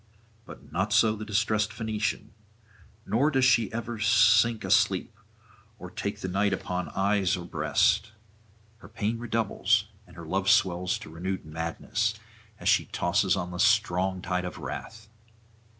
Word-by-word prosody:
But - - -13
not - - -1
so 110 -1 +4
the 110 - -7
distressed 110 +1 0
Phoenician, 105 0 -3 0.7
nor 135 +7 +2
does 135 -3 +2
she 115 -4 +3
ever 115 0 -5
sink 110 +1 +4
asleep 110 -1 +2 0.6
or 90 -4 -10
take 100 - -4
the - - -3
night 100 +2 +1
upon 90 -1 -3
eyes 100 -1 +1
or 85 - -7
breast; 100 - +1 0.7
her - - -15
pain 110 +2 -2
redoubles, 110 -2 0 0.2
and - - -17
her 85 -1 -9
love 95 +4 -1
swells 90 0 +2
to - - -11
renewed 95 +3 -4
madness, 80 +1 -2 0.4
as - - -5
she - - +4
tosses - - +1
on 90 -2 -4
the 90 - -7
strong 90 +1 +2
tide 90 0 -1
of 90 -2 -6
wrath. 110 -1 -7
100 Hz, 150 wpm, -27 LUFS, 90-110 Hz, 0.7 s, so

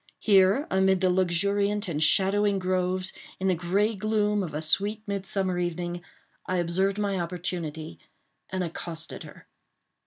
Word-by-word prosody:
Here, 200 +6 +4
amid 190 0 +3
the 185 -1 +3
luxuriant 200 +3 +1
and 155 -3 0
shadowing 200 +4 +3
groves, 185 0 -1 0.3
in 190 - 0
the 185 - +4
gray 190 +6 +1
gloom 210 0 0
of 165 -6 -5
a 150 - -2
sweet 205 +7 +2
midsummer 195 -2 -2
evening, 175 0 -3 0.5
I 185 - -1
observed 185 +3 0
my 200 -2 -1
opportunity 170 -2 -4 0.5
and 185 -1 -2
accosted 165 -1 -6
her. - - -12
185 Hz, 135 wpm, -27 LUFS, 175-200 Hz, 0.5 s, Here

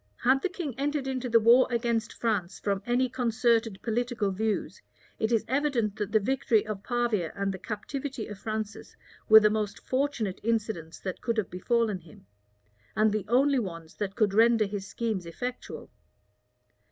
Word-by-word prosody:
Had 260 +2 +4
the 380 - 0
king 345 -7 -4
entered 290 0 -1
into 260 -1 -3
the 230 0 +6
war 235 +3 +6
against 235 -1 0
France 200 -6 -1
from 200 -1 -1
any 250 +2 +2
concerted 235 -4 +1
political 235 -3 -1
views, 215 +2 -2 0.4
it 220 +1 0
is 225 -2 +2
evident 260 -6 0
that 210 -1 -3
the 220 - +4
victory 220 -1 +1
of 210 -2 -5
Pavia 235 -8 0
and 200 -1 -1
the 190 - -7
captivity 235 +6 -5
of 210 -2 -9
Francis 215 0 -5 0.3
were 220 0 +11
the 210 -1 +3
most 210 0 -2
fortunate 255 -8 -1
incidents 215 -8 -2
that 185 -2 -5
could 230 -1 -1
have 215 - -1
befallen 215 +2 0
him, 160 - -17 0.7
and 215 0 +3
the 210 -2 -2
only 270 +4 +3
ones 165 -6 -6
that 200 -1 -3
could 210 -4 +2
render 225 0 +5
his 200 -1 -5
schemes 210 -5 -3
effectual. 245 +9 -6
220 Hz, 165 wpm, -28 LUFS, 205-245 Hz, 0.7 s, were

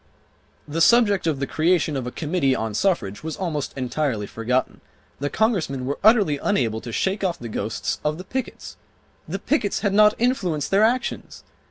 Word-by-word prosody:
The 160 +3 -2
subject 205 -3 +4
of 155 -3 +1
the 135 - -1
creation 160 +1 +1
of 130 -2 -3
a - - -4
committee 150 -4 0
on 110 -2 -3
suffrage 105 - 0
was 160 -1 -5
almost 155 -7 -3
entirely 125 -4 -1
forgotten. 120 +5 -2 0.4
The 145 +1 -2
Congressmen 165 - 0
were 140 +2 -3
utterly 205 -10 +4
unable 115 - 0
to 120 - -7
shake 190 - -1
off 180 -3 0
the 120 - -7
ghosts 110 0 -3
of 150 +1 -1
the 185 - -7
pickets. 260 +7 -6 0.5
The - - -3
pickets 245 -11 -1
had 200 -2 0
not 210 +1 +5
influenced 190 - 0
their 195 +1 +4
actions! 245 +3 -1
160 Hz, 175 wpm, -23 LUFS, 130-200 Hz, 0.5 s, not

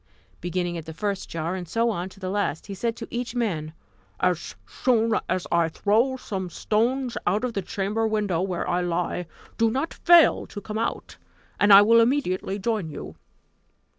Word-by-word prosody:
Beginning 175 -1 -2
at 160 - -11
the 160 - -7
first 200 0 -3
jar, 165 +1 -3
and 180 -3 -5
so 230 +1 +1
on 180 -2 -4
to 195 - -17
the 185 -1 -4
last, 205 -5 -1
he 200 - -7
said 225 +4 -2
to - - -7
each 240 0 -4
man: 170 -11 -1 0.5
"As 175 -2 0
soon 230 - +1 0.2
as 185 -1 -1
I 170 -1 +3
throw 225 +10 +1
some 190 -7 -5
stones 240 +8 0
out 200 +6 +1
of 250 -2 -1
the 200 - -1
chamber 210 +4 -1
window 205 -6 0
where 185 -2 -2
I 180 0 +1
lie, 175 0 -2 0.3
do 230 0 +4
not 270 +8 -2
fail 345 -2 +5
to 205 - -7
come 215 +2 -5
out, 230 - -3 0.4
and 205 - +5
I 200 +1 +10
will 230 +2 +6
immediately 230 -6 0
join 210 -4 -1
you." 150 - -8
200 Hz, 185 wpm, -25 LUFS, 180-230 Hz, 0.5 s, I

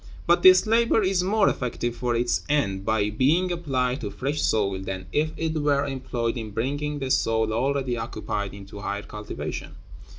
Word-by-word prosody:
But 175 +1 +4
this 185 0 +8
labor 225 0 +3
is 185 -1 +2
more 200 +3 +2
effective 120 -1 -2
for 120 0 -1
its 120 +1 +1
end 100 -11 +1
by 105 -1 +1
being 155 - +2
applied 135 -7 -1
to 105 - -3
fresh 140 +8 -2
soil 100 -3 +1
than 95 -1 -5
if 155 +1 +1
it 160 -1 -1
were 145 -2 +1
employed 130 -4 -2
in 110 -2 -5
bringing 145 +7 -2
the 135 -2 -3
soil 110 -2 +1
already 130 +1 0
occupied 110 -3 -4
into 100 0 -10
higher 100 0 -3
cultivation. 105 0 -6
125 Hz, 170 wpm, -25 LUFS, 110-150 Hz, -, this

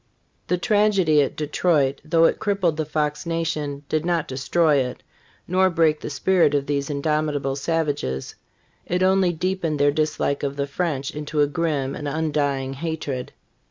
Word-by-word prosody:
The 180 - +1
tragedy 195 -6 +3
at 140 - -1
Detroit,^: 150 -2 +1
though 165 +2 +3
it - - +2
crippled 200 -6 +1
the 155 - -1
Fox 150 +1 -2
nation, 155 -4 -2
did 155 0 0
not 170 -2 0
de - - -7
stroy 145 +1 +2
it, 125 0 -7 0.4
nor 185 +1 +3
break 160 -3 +2
the - - -5
spirit 165 0 +2
of 140 -1 0
these 140 0 -1
indomitable 145 -1 -1
savages; 145 - -2 0.5
it 180 +1 0
only 190 -1 +3
deepened 175 -2 -1
their 145 0 +4
dislike 150 -1 -1
of 140 -1 -2
the 140 -1 -1
French 140 -2 -2
into 150 0 -2
a - - +6
grim 145 -3 -1
and 145 - -5
undying 145 -3 -1
hatred. 140 -3 -4
150 Hz, 160 wpm, -23 LUFS, 140-170 Hz, 0.5 s, a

